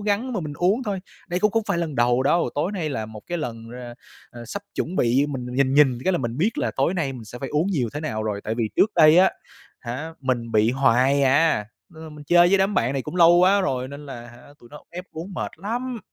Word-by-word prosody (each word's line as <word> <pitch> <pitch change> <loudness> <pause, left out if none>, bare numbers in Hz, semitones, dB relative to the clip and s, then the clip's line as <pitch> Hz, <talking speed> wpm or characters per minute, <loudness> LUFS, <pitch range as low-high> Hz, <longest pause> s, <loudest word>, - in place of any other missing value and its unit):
gắng 210 +5 -1
mà 200 - -2
mình 150 -2 -5
uống 200 +8 +1
thôi. 200 -4 -3 0.3
Đây 180 +1 -2
cũng 210 - +3
không 225 -1 +1
phải 175 -4 0
lần 165 -4 -3
đầu 120 +1 +2
đâu, 170 +5 +2
tối 150 +7 -1
nay 175 -6 -3
là 110 -5 -3
một 110 -1 -10
cái 175 - -3
lần 115 -6 -6
ra 120 0 -9 0.4
à, 120 - -11
sắp 200 - -6
chuẩn 180 +4 -3
bị 130 +5 +2
mình 130 -3 -5
nhìn 135 0 +2
nhìn 135 -4 +4
cái 190 - +2
là - - +1
mình 120 -2 -4
biết 210 +8 0
là - - 0
tối 140 +7 +1
nay 150 -7 -1
mình 120 -3 -9
sẽ 120 +3 -10
phải 135 - -5
uống 150 +4 0
nhiều 150 -12 -1
thế 150 - -3
nào 110 -8 -3
rồi, 105 -2 -3
tại 110 - -2
vì 115 -2 -1
trước 215 - +3
đây 160 +1 +6
á 190 - +5 0.5
hả, 145 +8 -6
mình 120 -3 -2
bị 110 +2 +3
hoài 135 +2 +3
à, 135 -4 +3 0.2
nên 160 -3 -13
là - - -9
mình 150 -1 -12
chơi 175 +3 +5
với 195 - +3
đám 195 +2 +1
bạn 120 +4 +1
này 135 - -2
cũng 180 - -7
lâu 170 -1 +7
quá 185 +3 +4
rồi 130 -8 -2
nên 145 +1 -10
là 120 -3 -8
hả, 120 +1 -15 0.2
tụi 120 - -17
nó 150 - -12
ép 180 +2 -7
uống 170 +5 -7
mệt - - -3
lắm. 240 +6 -4
145 Hz, 270 wpm, -23 LUFS, 120-180 Hz, 0.5 s, lâu